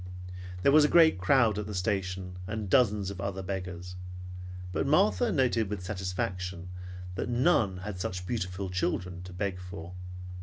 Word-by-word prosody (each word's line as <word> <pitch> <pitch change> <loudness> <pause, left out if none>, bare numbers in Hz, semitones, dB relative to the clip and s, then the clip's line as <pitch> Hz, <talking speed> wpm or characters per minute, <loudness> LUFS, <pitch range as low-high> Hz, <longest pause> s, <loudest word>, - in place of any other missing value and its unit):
There - - +6
was 150 +1 +8
a - - +6
great 160 - +6
crowd 110 +2 +4
at 105 - -4
the 105 - -4
station, 90 -1 -1
and 105 -2 -3
dozens 105 -6 +4
of 95 -1 -6
other 100 -1 -3
beggars; 90 -1 -5 0.8
but 90 - 0
Martha 205 - +4
noted 120 - +2
with 100 -3 -4
satisfaction 90 -2 -3 0.4
that 90 - -3
none 120 - +3
had 95 0 -5
such 90 0 -3
beautiful 95 -3 -2
children 90 0 -1
to 90 0 -9
beg 90 0 -2
for. 90 -1 -8
95 Hz, 155 wpm, -30 LUFS, 90-110 Hz, 0.8 s, was